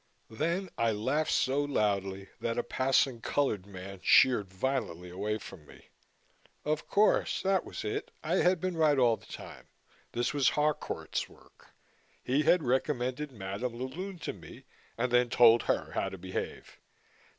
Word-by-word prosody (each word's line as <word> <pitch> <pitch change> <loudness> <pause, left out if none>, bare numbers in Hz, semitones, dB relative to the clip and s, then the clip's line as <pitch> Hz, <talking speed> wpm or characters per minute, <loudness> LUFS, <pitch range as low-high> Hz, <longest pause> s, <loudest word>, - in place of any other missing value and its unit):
Then 170 - -1
I 115 -1 +3
laughed 145 +9 0
so 135 +2 +2
loudly 100 -7 -1
that 115 - -2
a - - +1
passing 130 -2 +1
colored 110 -11 0
man 95 0 -9
sheered 105 -8 +5
violently 95 -5 -2
away 105 +4 -2
from 90 -7 -12
me. - - -17 0.8
Of 155 +1 -1
course, 210 +1 +2
that 190 -1 +2
was - - -7
it. 105 - -3
I 165 +4 +1
had 180 -1 +3
been 185 +1 -2
right 155 -3 +3
all 120 -3 +4
the - - -19
time. - - -10 0.5
This 120 +3 0
was 140 -3 +3
Harcourt's 150 0 -1
work. - - -21 0.5
He 135 +4 +2
had 165 +2 +4
recommended 130 +2 -1
Madame 105 +2 -4
la 125 - -3
Lune 185 +8 -6
to - - -2
me - - -13 0.3
and 125 +1 0
then 125 0 +4
told 115 0 +6
her - - -1
how - - -1
to 95 - -8
behave. 95 +1 -6
125 Hz, 160 wpm, -30 LUFS, 105-150 Hz, 0.8 s, told